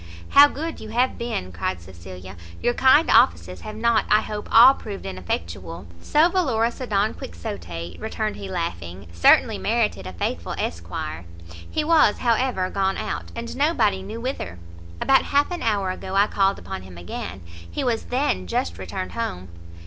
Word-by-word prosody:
"How 285 +1 +8
good 320 +3 -5
you 220 - -9
have 245 +4 0
been!" 230 - -3
cried 85 +1 -3
Cecilia; 90 +2 -11 0.2
"your 240 - +1
kind 265 +6 +5
offices 85 +2 +3
have 215 - -7
not, 230 0 +2
I 215 - +5
hope, 210 -1 -6
all 245 +4 +9
proved 205 -6 -8
ineffectual!" 85 -1 -5 0.2
"So 305 - +4
valorous 255 -11 0
a 255 - -4
Don 205 0 +1
Quixote," 85 -1 -7
returned 220 0 -3
he, 195 - -7
laughing, 95 - -4
"certainly 85 - +4
merited 95 +2 0
a 95 - -7
faithful 85 0 -3
Esquire! 85 0 -4 0.2
He 85 - -5
was, 305 -9 +4
however, 235 -5 +1
gone 195 -1 0
out, - - -4
and 235 0 -6
nobody 240 - +2
knew 210 +4 -7
whither. 230 - -4 0.4
About 270 - +4
half 285 +4 +2
an 350 - -4
hour 205 -5 0
ago 190 +1 -6
I 200 +1 +5
called 195 -1 +1
upon 95 - -7
him 95 -2 -12
again; 85 +2 -6 0.3
he 85 - -3
was 235 -3 -1
then 245 - -1
just 85 0 -2
returned 95 0 -5
home." 90 +1 -4
195 Hz, 165 wpm, -23 LUFS, -, 0.4 s, all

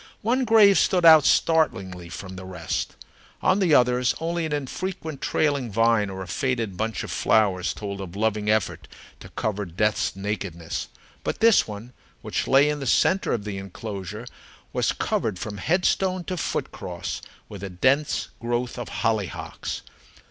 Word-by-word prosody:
One 250 +4 +2
grave 210 -3 +6
stood 180 -2 +2
out 160 -3 +9
startlingly 95 - +1
from 95 +2 -8
the 95 - -8
rest. 90 -3 -4 0.5
On 190 - +3
the 175 -6 +4
others 125 0 +3
only 165 0 -1
an - - -8
infrequent 155 +2 -4
trailing 140 -6 0
vine 115 -1 +3
or 95 0 -5
a - - -10
faded 115 +1 -1
bunch 110 +3 -2
of - - -6
flowers 95 -4 +2
told 100 -1 -6
of 95 -1 -8
loving 105 0 0
effort 90 -8 0 0.3
to - - -11
cover 105 -1 -2
death's 100 +4 0
nakedness. 95 -4 -4 0.4
But - - -3
this 225 -1 +5
one, 110 +4 -8 0.3
which - - -2
lay 135 +2 +5
in 150 0 -1
the 135 - -4
centre 190 +10 +3
of 110 - -1
the 100 -2 -4
enclosure, 100 +2 -7 0.5
was - - +1
covered 105 -5 -1
from 105 +3 -5
headstone 185 - +1
to 185 - -4
foot 175 - -2
cross 85 -1 -5 0.3
with 100 -2 -9
a 100 - -4
dense 130 +11 +1
growth 120 +1 -2
of 120 - -5
hollyhocks. 110 -5 -3
110 Hz, 160 wpm, -25 LUFS, 95-150 Hz, 0.5 s, out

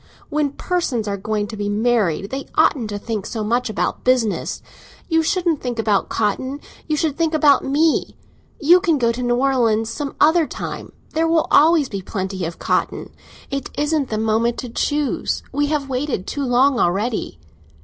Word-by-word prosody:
When 295 -2 0
persons 285 -11 -1
are 200 - -1
going 210 +1 -2
to 220 - -6
be 205 -1 -3
married 205 -4 +1
they 270 +1 -4
oughtn't 240 -7 +2
to 205 - -3
think 210 -1 -4
so 220 -2 -3
much 240 +3 0
about 215 - -2
business. 250 -5 0 0.4
You 325 -2 +3
shouldn't 340 -2 0
think 245 -2 -3
about 215 -3 +1
cotton, 260 +6 -1 0.3
you 305 -1 0
should 300 -2 0
think 330 0 0
about 290 -3 +4
me. 300 +4 +1 0.4
You 345 +4 +6
can 340 -5 +1
go 235 -3 +2
to 240 +2 -5
New 245 -1 +1
Orleans 235 -4 +1
some 285 -2 -5
other 320 +1 +4
time—there 325 +1 -4
will 325 -1 +2
always 310 -1 +5
be 200 -4 -5
plenty 190 -1 -4
of 165 +1 -5
cotton. - - -1 0.4
It 275 -1 -3
isn't 295 -2 0
the 215 - -2
moment 225 +2 +1
to 250 - -7
choose—we 290 +2 -1
have 295 -2 -1
waited 260 -6 -2
too 285 -1 -3
long 255 +1 +3
already." 195 - -1
250 Hz, 170 wpm, -20 LUFS, 220-295 Hz, 0.4 s, You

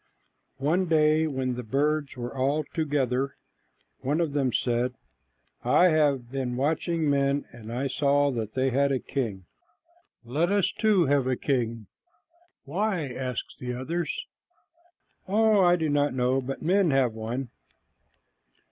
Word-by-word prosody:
One 170 +7 +1
day 155 0 +3
when 130 -3 -2
the 125 - -4
birds 140 +4 -1
were 120 +2 -5
all 140 +4 +1
together, 140 -4 0 0.6
one 145 +5 -1
of 165 -4 0
them 135 -3 +1
said, 120 +1 0 0.7
"I 180 - +5
have 140 -6 +1
been 130 -2 -2
watching 160 +3 0
men, 140 0 +1
and 115 -1 -10
I 125 +4 -2
saw 140 +1 +2
that 110 -3 -4
they 130 0 +1
had 140 +2 +2
a 135 - +2
king. 110 -9 -4 0.8
Let 155 +10 0
us 200 -3 +2
too 210 -5 +3
have 140 -2 +2
a 130 - +1
king." 115 -5 -1 0.8
"Why?" 175 -1 -1
asked 125 -2 -5
the 125 -1 -4
others. 165 +7 -3 1.0
"Oh, 215 +1 +4
I 175 0 +5
do 160 -3 -1
not 145 -2 +1
know, 130 +1 +1
but 135 +1 -6
men 185 +2 +3
have 135 -4 +2
one." 115 +4 -4
140 Hz, 140 wpm, -27 LUFS, 125-155 Hz, 1.0 s, I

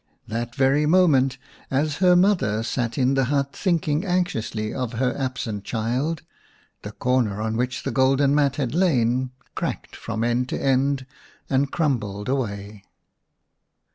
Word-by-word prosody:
That 120 +2 -4
very 140 +3 +3
moment, 145 -7 +4 0.3
as 145 +2 0
her 180 -1 +5
mother 175 - +2
sat 120 -1 -2
in 130 0 +3
the 135 -1 +2
hut 140 +1 0
thinking 165 -4 0
anxiously 145 - -1
of 125 -2 -3
her 125 +2 0
absent 125 -6 -3
child, 125 +9 -2 0.6
the 105 - -7
corner 120 -5 0
on 110 +1 -2
which 125 +2 -2
the 135 - -2
golden 135 +2 +3
mat 145 -2 +2
had 135 -5 -2
lain 130 -8 +2 0.2
cracked - - -4
from 110 0 -4
end 120 +2 0
to - - -2
end 135 0 +1 0.5
and 135 +1 +2
crumbled 110 - -1
away. 100 -6 -3
130 Hz, 140 wpm, -23 LUFS, 115-145 Hz, 0.6 s, her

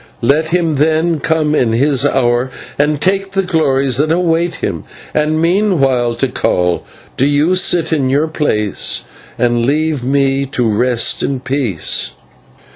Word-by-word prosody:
Let 150 +6 +2
him 165 -1 0
then 160 +3 +1
come 155 0 0
in 120 -6 +1
his 135 +2 +2
hour 125 -2 +1 0.3
and 150 0 +1
take 195 +3 0
the 195 0 +1
glories 140 -7 +1
that 155 +3 +1
await 170 0 +1
him, - - -4 0.3
and 155 +1 0
meanwhile, 155 - +1
Tikal, 90 -9 0 0.4
do 135 - +2
you 145 +5 +2
sit 175 -3 +1
in 135 -4 0
your 145 +4 +1
place 105 - -1 0.3
and 120 -1 +1
leave 150 +1 0
me 135 +1 +1
to 125 -3 -1
rest 115 +2 +1
in 135 -2 -2
peace." 130 - -2
145 Hz, 140 wpm, -15 LUFS, 130-160 Hz, 0.4 s, Let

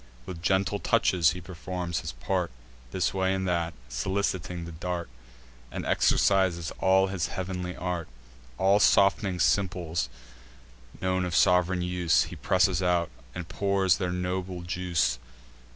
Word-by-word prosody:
With 90 -2 -7
gentle 95 +2 +1
touches 85 -5 +3
he 90 - -7
performs 90 0 -4
his - - -6
part, 85 +8 -1 0.4
This 85 +3 -1
way 95 0 +1
and 95 0 -2
that, 85 -1 -1
soliciting 90 +5 -2
the 85 - -8
dart, 85 +1 -4 0.6
And - - -5
exercises 90 -5 +2
all 95 0 +4
his 95 -3 -2
heav'nly 90 -1 -4
art. 90 -2 -3 0.5
All 100 +2 +4
soft'ning 100 -2 +3
simples, 85 -7 +1 0.9
known 95 0 0
of 90 -1 -2
sov'reign 90 -1 +3
use, 90 -2 +2
He - - -8
presses 95 -1 +2
out, 90 -4 +1 0.2
and 90 -2 -5
pours 100 -2 +2
their 90 -2 -2
noble 90 0 -3
juice. 85 -8 0
90 Hz, 135 wpm, -27 LUFS, 85-95 Hz, 0.9 s, all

